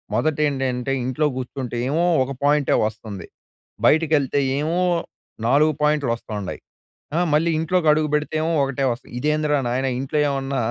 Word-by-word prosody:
మొదట 155 -1 +1
ఏంటంటే, 130 -1 -2
ఇంట్లో 130 +4 +1
కూర్చుంటే 125 -1 -5
ఏమో 165 +5 +1 0.2
ఒక 140 - -6
పాయింటే 145 -1 +3
వస్తుంది. 105 -4 -6 0.6
బయటికెళ్తే 150 -3 +2 0.2
ఏమో 160 +4 0 0.7
4 150 +5 +4
పాయింట్లు 150 -5 +2
వస్తుండాయి. 105 -5 -6 0.6
ఆహ్, 175 +1 +2
మళ్ళీ 165 +3 +3
ఇంట్లోకి 165 +1 0
అడుగు 155 0 +1
పెడితే 150 +1 -1
ఏమో 165 - 0
ఒకటే 135 0 -1
వస్తది. 120 - -10
ఇదేందిరా 150 +1 +1
నాయన 130 +3 0
ఇంట్లో 135 +3 -2
ఏమన్నా 135 -1 -2
145 Hz, 140 wpm, -22 LUFS, 130-155 Hz, 0.7 s, 4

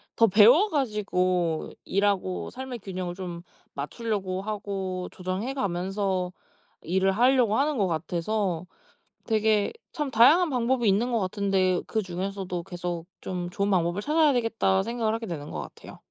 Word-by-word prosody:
더 230 - +6
배워 230 - +6
가지고 185 - 0 0.2
일하고 200 -2 0
삶의 255 -2 -7
균형을 185 -2 -5
좀 175 -2 -7 0.3
맞추려고 190 +4 -3
하고 195 -3 -4
조정해 185 +8 -3
가면서 190 -3 -1 0.5
일을 190 +3 +1
하려고 240 0 +3
하는 295 -1 +1
것 200 - +2
같아서 175 +2 -1 0.6
'되게 215 -2 +2 0.2
참 295 -3 -2
다양한 305 +10 +6
방법이 245 -2 +1
있는 230 +6 +2
것 230 - +2
같은데 190 -2 +1
그중에서도 190 -3 -3
계속 175 -1 -5 0.2
좀 180 -1 -4
좋은 200 +2 -1
방법을 175 +2 +1
찾아야 300 0 +3
되겠다.' 225 -5 +1
생각을 230 -1 -1
하게 225 0 -3
되는 150 -4 -5
것 - - -4
같아요. - - -11
195 Hz, 310 characters per minute, -26 LUFS, 180-230 Hz, 0.6 s, 더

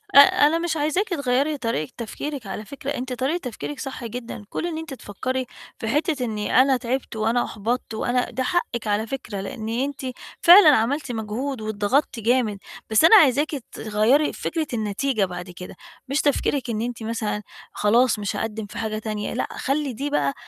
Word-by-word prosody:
آآ، - - +12
أنا 290 +2 +6
مش 335 -1 -1
عايزاكِ 310 +8 0
تغيّري 285 -2 +1
طريقة 230 - -2
تفكيرِك 255 +1 -5
على 205 +3 -5
فكرة، 280 +3 -7
أنتِ 260 -2 -3
طريقة 265 +7 0
تفكيرِك 215 - -6
صح 265 -2 -6
جدًا، 230 -1 -6
كون - - -3
إن 335 -2 -3
أنتِ 320 -2 -6
تفكّري 255 +3 -3 0.3
في 225 - -4
حتة 295 - 0
إنّي 215 +2 +2
أنا 265 0 +3
تعبتِ 250 0 -3
وأنا 225 +3 +1
أحبطت 225 +3 -3
وأنا 245 +3 0
ده 260 - -2
حقِّك 250 -7 -1
على 210 +2 0
فكرة، 225 -6 -5
لإن 220 +1 -5
أنتِ 265 +5 -2 0.4
فعلًا 355 -1 +9
عملتِ 260 +5 0
مجهود 230 +3 -3
واتضغطتِ 215 +5 0
جامد، 230 -2 +1 0.3
بس 220 +4 +4
أنا 385 - +9
عايزاكِ 295 - +5 0.2
تغيّري 220 +8 +2
فكرة 320 -2 -2
النتيجة 220 +1 0
بعد 180 0 -7
كده، 180 +1 -9 0.3
مش 275 +3 +1
تفكيرِك 280 -2 0
إن 220 -2 -1
أنتِ 235 -1 -4
مثلًا 220 -2 -2 0.3
خلاص 230 +2 +3
مش 205 -1 -2
هاقدّم 220 -1 -3
في 205 - -10
حاجة 215 0 -2
تانية، 215 -1 -4
لأ، 250 - -1
خلّي 275 -1 -1
دي 280 +6 -3
بقى 140 - +1
245 Hz, 175 wpm, -23 LUFS, 215-280 Hz, 0.4 s, آآ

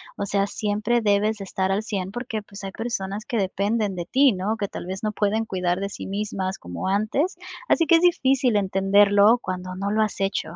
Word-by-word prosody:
o 200 - -3
sea, 200 0 0
siempre 210 +4 0
debes 210 +1 +2
de - - -5
estar 190 0 -2
al 205 +3 -1
100 195 -4 -3
porque, 225 -1 -4
pues 200 -1 -12
hay 195 - -5
personas 210 -2 -4
que - - -4
dependen 200 +1 0
de 175 -1 -4
ti, 265 +7 +4
¿no?, 200 +2 -1
que 205 -3 -3
tal - - -7
vez 190 +3 -6
no 215 - 0
pueden 210 +2 0
cuidar 180 -3 -1
de 200 - -2
sí - - -7
mismas 195 -1 -3
como 90 - -6
antes. 215 - 0 0.3
Así 330 - +3
que 335 - +6
es - - 0
difícil 270 -8 +3
entenderlo 200 +2 +4
cuando 185 0 -5
no 195 +2 -2
lo 215 +1 +2
has 215 -1 -1
hecho, 195 -3 -2
205 Hz, 215 wpm, -24 LUFS, 195-220 Hz, 0.3 s, que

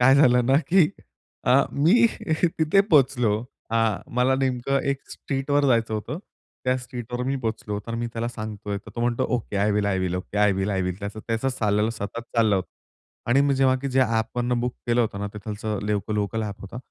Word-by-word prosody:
काय 130 +2 +6
झालं 125 -4 +5
ना, 135 +2 +5
की 180 -4 +5 0.5
अ, - - +2 0.2
मी 195 +12 +5 0.5
तिथे 160 +5 +4
पोहोचलो. 125 - +3 0.3
अ, 115 - +1 0.4
मला 125 +2 +3
नेमकं 135 0 0
एक 140 0 -2
स्ट्रीटवर 140 +1 -1
जायचं 115 -4 +2
होतं. 110 +9 -4 0.5
त्या 130 0 +2
स्ट्रीटवर 125 -1 -6
मी 135 +1 0
पोहोचलो. 110 -4 -3
तर 115 - -4
मी 120 0 -2
त्याला 115 +1 -2
सांगतोय, 105 -3 -5
तर - - -13
तो - - -2
म्हणतो, 120 0 +1
"okay 105 -3 -5
I 100 +2 +2
will, 105 0 +1
I 95 -2 +1
will. 90 -1 -1
Okay, 95 +3 -4
I 105 -1 +4
will, 95 +1 -1
I 95 -2 0
will." 90 0 -3
त्याचं 100 +1 -6
त्याचं 115 +3 0
चाललेलं 105 -4 +1
सतत 110 0 -5 0.2
चाललं 110 -4 +4
होतं 95 - -3 0.6
आणि 135 +3 +5
मी 140 0 +3
जेव्हा, 130 -1 +3
की 140 - -1
जे 130 0 +2
ॲपवरून 120 +1 0
बुक 125 0 -2
केलं 120 0 +3
होतं 110 -4 -1
ना, 100 - -2
तिथला 105 0 -4
लेवकल 105 0 -1
लोकल 105 +2 -1
ॲप 100 -2 -5
होता, 100 +4 -9
115 Hz, 200 wpm, -24 LUFS, 105-130 Hz, 0.6 s, काय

